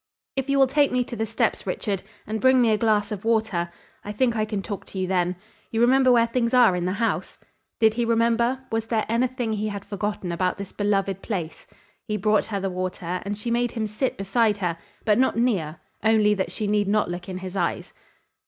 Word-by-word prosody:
"If 270 0 -2
you 275 - +3
will 270 - +6
take 285 +2 +2
me 250 0 +2
to 240 - -7
the 225 -1 -2
steps, 225 -2 -1
Richard, 195 +1 -2 0.2
and 220 +1 -3
bring 260 0 +5
me 235 -3 +4
a 215 - +3
glass 215 -2 +2
of 205 -2 -5
water, 220 -7 +1 0.3
I 205 - -5
think 235 +2 +1
I 215 -1 +1
can 210 -2 -3
talk 200 -1 -5
to - - -9
you 185 - 0
then. 180 -1 0 0.3
You 225 - -2
remember 255 +2 +5
where 235 -1 +5
things 235 +1 0
are 240 -7 +6
in 175 -1 -2
this 185 +2 -1
house?" 230 0 -1 0.4
Did 220 -1 +5
he 240 +1 0
remember? 235 +2 +2
Was 225 0 -1
there 225 -2 0
anything 240 0 0
he 215 0 -1
had 200 -2 -5
forgotten 200 -2 -3
about 180 +2 0
this 200 -1 -7
beloved 195 -2 0
place? 175 -7 -5 0.4
He 210 -1 -1
brought 210 +1 +2
her 205 -3 -3
the 195 - -2
water 180 -1 -3
and 205 +1 -4
she 235 +3 -4
made 240 0 +1
him 225 -2 -2
sit 215 +5 -2
beside 210 +2 +1
her, 175 -4 -2 0.3
but 215 +1 +3
not 260 -3 +2
near, 180 -10 0 0.2
only 220 -1 +4
that 195 -2 -2
she 215 - -3
need 205 -1 +1
not 210 -2 +1
look 175 +1 -6
in 185 - -4
his 185 0 -7
eyes. 175 -3 -2
215 Hz, 225 wpm, -24 LUFS, 195-235 Hz, 0.4 s, will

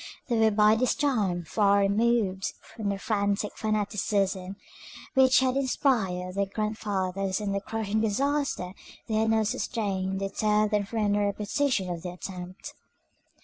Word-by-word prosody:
They 240 - +2
were 220 0 +5
by 210 0 +5
this 245 +3 +2
time 215 -12 0
far 200 +3 +3
removed 200 -1 +1
from 215 -3 -6
the 200 - -1
frantic 200 0 -1
fanaticism 200 -3 -1 0.6
which 260 -1 +5
had 260 -1 +1
inspired 220 -9 0
their 200 +1 0
grandfathers, 195 -2 -2
and 205 -2 -2
the 200 - -1
crushing 220 0 -2
disaster 260 -3 0 0.3
they 220 - -3
had 220 0 +2
now 220 0 +3
sustained 195 -4 -2
deterred 210 +2 +1
them 205 -1 +1
from 225 +2 -3
any 205 0 +2
repetition 205 +1 0
of 170 -1 -4
the 180 - -5
attempt. 180 0 -8
205 Hz, 145 wpm, -27 LUFS, 195-225 Hz, 0.6 s, were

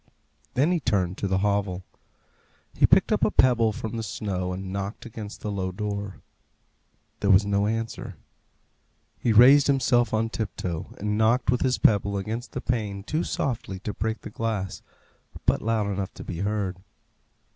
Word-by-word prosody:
Then 145 +7 +3
he 175 - +2
turned 100 - 0
to 100 - -1
the 95 0 +1
hovel. 100 -3 0 0.9
He - - +4
picked - - +4
up - - +2
a - - +4
pebble 115 -4 +4
from 110 +2 -5
the - - -2
snow, 95 -4 -3
and 95 +1 -5
knocked 100 +4 -4
against 110 -3 -8
the 105 - -3
low 95 -2 -2
door. 100 0 -4 1.0
There 100 - 0
was 100 +1 +6
no 100 0 +1
answer. 115 +1 -3 1.0
He 120 - +1
raised 130 +6 +7
himself 130 -3 +3
on 110 +1 +1
tiptoe, 90 -7 -4
and 105 +1 -1
knocked 120 +3 +3
with 125 - +1
his 130 -1 +2
pebble 100 -1 +3
against 110 +5 -4
the - - -3
pane 105 -5 -2
too 155 - -1
softly 115 -7 -3
to 105 - -4
break 110 +2 -3
the - - -8
glass, 105 -4 -3 0.6
but - - +2
loud 110 -1 0
enough 100 -1 -3
to - - -8
be 85 - -6
heard. 100 -2 -1
105 Hz, 165 wpm, -26 LUFS, 100-115 Hz, 1.0 s, raised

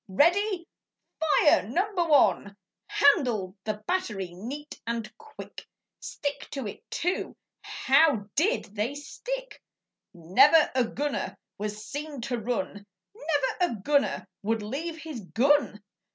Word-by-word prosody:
Ready! 345 - +2 0.5
Fire 310 -1 +4
number 370 - +1
one!' 210 - +3 0.3
Handled 240 - +3
the 215 -1 -3
battery 210 - -2
neat 270 +11 -8
and 230 -1 -3
quick! 450 -1 -11 0.3
Stick 285 -1 -4
to 275 -4 -4
it, 205 - -7
too! 355 +3 -2 0.2
How 270 -6 +3
DID 405 +11 +2
they 225 +7 -1
stick! - - -6 0.5
Never 195 - +5
a 255 -2 +2
gunner 290 +5 -3 0.2
was 210 +1 -4
seen 290 +5 -5
to 240 0 -2
run! 205 -3 -3 0.3
Never 290 +1 0
a 220 - -7
gunner 285 +4 +1
would 220 +1 -1
leave 315 +10 -4
his 315 -5 -7
gun! 235 +1 +2
275 Hz, 120 wpm, -27 LUFS, 210-320 Hz, 0.5 s, Never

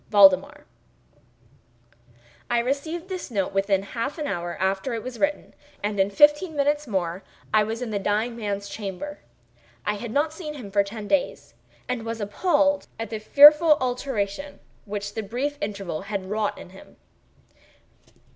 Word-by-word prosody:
VALDEMAR 195 -3 +5 1.8
I 240 - +2
received 285 +8 -2
this 370 -5 -5
note 195 -5 -1
within 195 0 +1
half 235 +8 -4
an 305 - -3
hour 175 -8 -3
after 195 +6 -1
it 225 - -5
was 250 -2 -7
written, 295 0 -1 0.3
and 205 -1 -2
in 195 +1 +3
fifteen 295 - +4
minutes 290 +1 +1
more 185 -3 -2 0.3
I 215 -1 +5
was 225 +3 -3
in 230 - -5
the 205 - -1
dying 215 +4 0
man's 205 -3 -3
chamber. 195 -1 -6 0.7
I 210 - 0
had 235 +3 -6
not 300 +5 +1
seen 310 -3 -7
him 225 -8 -9
for 200 0 +3
ten 205 +1 -7
days, 180 -9 -1 0.3
and 250 -2 -2
was 230 0 -4
appalled 290 - +1
by 225 - -3
the 220 0 -5
fearful 300 +7 +7
alteration 250 +1 -3 0.3
which 205 -1 -5
the 220 - -3
brief 250 +8 -3
interval 200 -6 -4
had 200 -1 -4
wrought 210 +2 -1
in - - -11
him. 190 - -15
220 Hz, 155 wpm, -25 LUFS, 200-280 Hz, 1.8 s, fearful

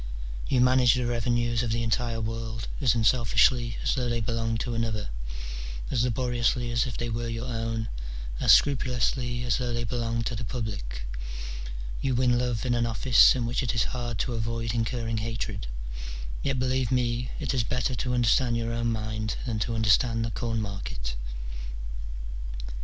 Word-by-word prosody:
You 130 - +3
manage 125 -1 +6
the 125 -1 0
revenues 120 -1 +1
of 120 - -1
the 115 +1 +1
entire 115 0 0
world, 115 0 -3
as 125 -3 +4
unselfishly 115 0 +3
as - - +2
though 125 -2 0
they 120 0 0
belonged 115 0 -1
to 120 - -2
another, 115 -2 -1 0.8
as 115 - +2
laboriously 120 0 +1
as 115 +1 +2
if 120 - -4
they 120 - -2
were 115 +1 -2
your 115 +1 -3
own, 115 -2 -2 0.5
as - - +5
scrupulously 125 -2 +3
as 120 +1 +1
though 125 -1 -1
they 120 - -1
belonged 115 0 -1
to 120 - -1
the 115 - -4
public: 100 - -4 1.0
you 130 -2 +1
win 125 -1 +3
love 125 -1 -1
in 125 - +2
an 120 -1 +2
office 115 +3 +6
in 125 -2 -1
which 120 +2 0
it 125 -2 -1
is 115 - +4
hard 120 -2 -3
to 125 - -3
avoid 115 0 -2
incurring 115 -1 -1
hatred; 110 - -3 0.7
yet, 135 -1 0
believe 130 -1 +1
me, 125 -1 +1
it - - -1
is 125 -3 +2
better 125 +3 0
to 125 0 -1
understand 120 0 +3
your 115 0 -1
own 115 0 0
mind 110 0 -2
than 115 -4 -1
to 115 +2 -1
understand 115 +1 +3
the 115 - -3
corn 115 -1 -1
market. 100 - -4
115 Hz, 170 wpm, -28 LUFS, 115-125 Hz, 1.0 s, manage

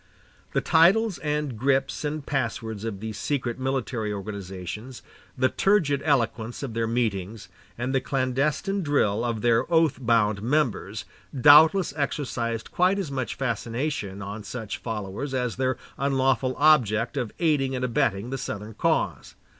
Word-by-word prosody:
The - - +2
titles 185 +5 +4
and 150 -4 -2
grips 135 +2 +1
and 150 -1 -3
passwords 115 -5 -3
of 100 -4 -5
these 110 -1 -5
secret 130 -4 -2
military 130 -4 -2
organizations, 100 +3 -6 0.3
the 130 0 +3
turgid 175 -9 +2
eloquence 120 -4 0
of 130 -5 -4
their 115 0 -1
meetings, 110 -4 -2 0.3
and 125 +3 -2
the 135 - +2
clandestine 140 +10 0
drill 120 - +1
of 115 -3 -2
their 120 +6 +2
oath 160 -4 +3
bound 110 -3 +2
members, 130 -2 -1 0.3
doubtless 155 +5 +7
exercised 120 -6 -2
quite 185 +2 +2
as 185 -8 -3
much 130 -5 -3
fascination 115 -4 -3
on 105 +2 -6
such 110 0 -6
followers 110 +4 -4
as 125 -3 -1
their 130 -1 0 0.2
unlawful 135 -2 +1
object 125 -7 +3
of 115 - -2
aiding 145 -5 +1
and 125 0 -1
abetting 120 -3 0
the 135 - -3
Southern 110 -2 -5
cause. - - -1
125 Hz, 140 wpm, -25 LUFS, 110-145 Hz, 0.3 s, doubtless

